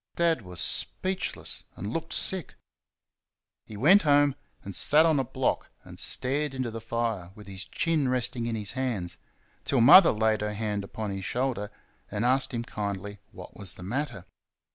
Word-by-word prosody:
Dad 165 -5 +2
was 90 -3 -2
speechless, 190 0 -1
and 105 +2 -5
looked 165 0 -4
sick. 190 -4 +2 1.1
He 105 - -9
went 175 - +6
home 145 -2 +4 0.3
and 100 -2 -6
sat 155 +2 +4
on 160 -3 +3
a - - +1
block - - -2
and - - -10
stared 135 +2 -1
into 130 -3 -3
the 115 0 -7
fire 115 -6 -2
with 105 - -12
his 95 -1 -7
chin 155 - 0
resting 125 -2 -2
in 115 - -2
his 105 -2 -3
hands, 105 -10 -3 0.5
till 135 - +1
Mother 165 +10 +9
laid 110 0 +1
her 105 0 -3
hand 105 -2 -2
upon 105 +1 -5
his 95 -1 -5
shoulder 120 -4 -2 0.4
and 105 +3 -2
asked 130 +2 +2
him 120 -2 -3
kindly 100 -2 -5
what - - -12
was 95 -3 -3
the 90 - -11
matter. 120 -2 -4
115 Hz, 170 wpm, -27 LUFS, 105-140 Hz, 1.1 s, Mother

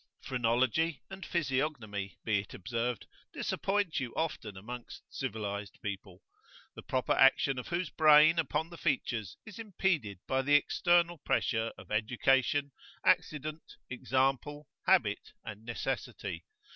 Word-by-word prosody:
Phrenology 130 +6 +1
and 190 0 -7
physiognomy, 130 - -2
be 110 -3 +2
it 100 - -8
observed, 120 +3 -3 0.3
disappoint 200 -4 -1
you 125 -3 -4
often 155 -11 -3
amongst 120 +5 -8
civilised 105 -5 -4
people, 95 -2 -6 0.5
the - - -9
proper 130 -1 -1
action 135 0 +4
of 125 - -7
whose 175 0 -2
brain 155 +1 +6
upon 160 +1 -1
the 170 - -10
features 110 -7 -1
is 220 +1 -10
impeded 180 - -1
by 130 0 +1
the 145 +2 +3
external 175 +2 +3
pressure 115 -5 0
of - - -13
education, 130 +5 +2 0.3
accident, 155 +1 0 0.2
example, 135 +3 0 0.2
habit, - - +2
and 105 +1 -8
necessity. 120 0 -4
130 Hz, 120 wpm, -31 LUFS, 110-155 Hz, 0.5 s, brain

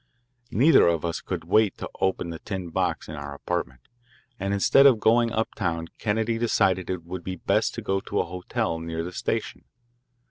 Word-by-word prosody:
Neither 140 - +5
of 85 -1 +1
us 85 - -2
could - - -4
wait 110 -2 +2
to - - -5
open 95 -2 0
the 80 - -7
tin 95 -4 -5
box - - -1
in 75 - -7
our 70 -1 -6
apartment, 70 -4 -4 0.6
and 100 0 -2
instead 120 +7 +6
of 125 -5 +5
going 115 +2 +3
uptown 85 -7 -2
Kennedy 110 +1 0
decided 95 -6 +1
it 90 -3 -3
would 85 +1 -7
be 95 - -4
best - - 0
to - - -5
go 95 0 0
to - - -3
a - - +1
hotel 90 -2 -3
near 80 0 -4
the 90 - -5
station. - - -3
95 Hz, 185 wpm, -25 LUFS, 85-110 Hz, 0.6 s, instead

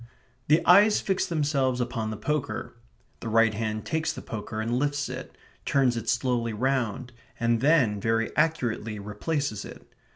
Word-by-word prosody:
The 155 +3 +3
eyes 205 +4 +6
fix 190 -1 -1
themselves 140 -5 0
upon 120 -3 -2
the 110 - -5
poker; 150 +6 -3 0.5
the 115 - -5
right 115 0 +4
hand 110 0 -3
takes 160 0 -1
the - - -8
poker 110 0 -6
and 115 +3 0
lifts 145 0 -1
it; - - -8 0.3
turns 130 -3 +2
it 115 -1 -3
slowly 120 -1 0
round, 125 0 -1 0.3
and 115 -1 +1
then, 135 -8 +3
very 115 +1 0
accurately, 120 -9 0
replaces 105 +4 -3
it. - - -11
120 Hz, 155 wpm, -26 LUFS, 110-145 Hz, 0.5 s, eyes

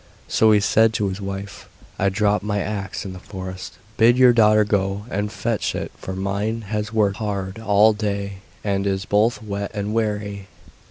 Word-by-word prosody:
So 110 0 +4
he 105 - +5
said 110 +2 +3
to 105 -2 0
his 95 +2 -5
wife: 100 0 -6 0.3
'I 95 - +1
have 95 - +2
dropped 105 0 +1
my 105 -1 -1
axe 100 -1 -4
in 95 - -6
the 90 - -9
forest, 95 -1 -8 0.2
bid 120 +2 +5
your 125 -1 +7
daughter 110 -2 +5
go 100 0 -1
and 105 +1 -2
fetch 115 -1 -2
it, - - -4
for 95 - -7
mine 100 +4 -2
has 105 +1 -3
worked 105 -3 +1
hard 100 -2 -3
all 110 0 +4
day 100 -2 -3 0.2
and 100 -1 0
is 95 -1 -1
both 105 +2 +1
wet 100 -1 -4
and 105 +1 -2
weary. 105 -3 -2
105 Hz, 185 wpm, -22 LUFS, 100-110 Hz, 0.3 s, your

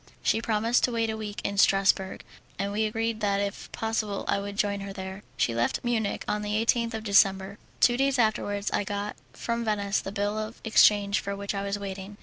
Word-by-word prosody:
She 225 - +2
promised 230 +2 +1
to 250 - -3
wait 230 -1 0
a - - -3
week 210 -1 -5
in 200 0 -1
Strassburg, 195 -1 +3 0.4
and 200 +1 -2
we 215 +2 +1
agreed 225 +1 -2
that 200 -2 +1
if 200 -1 -4
possible 220 -3 -2
I - - +1
would 200 0 -6
join 205 -1 +1
her 195 0 -6
there. 190 0 -7 0.2
She 115 - +1
left 115 +1 0
Munich 225 -4 -1
on 210 - 0
the 210 0 -2
18th 235 0 +1
of 220 - -5
December. 195 -1 +3 0.2
Two 240 0 +4
days 275 0 +2
afterwards 210 -3 0
I - - +1
got 205 +1 -4 0.2
from 235 0 -2
Venice 205 -2 0
the 195 - -6
bill 205 +1 -1
of 215 +1 -5
exchange 205 -2 +4
for 200 0 -4
which 200 +1 -4
I 200 - -2
was 200 0 -2
waiting. 200 0 -7
205 Hz, 210 wpm, -27 LUFS, 200-220 Hz, 0.4 s, Two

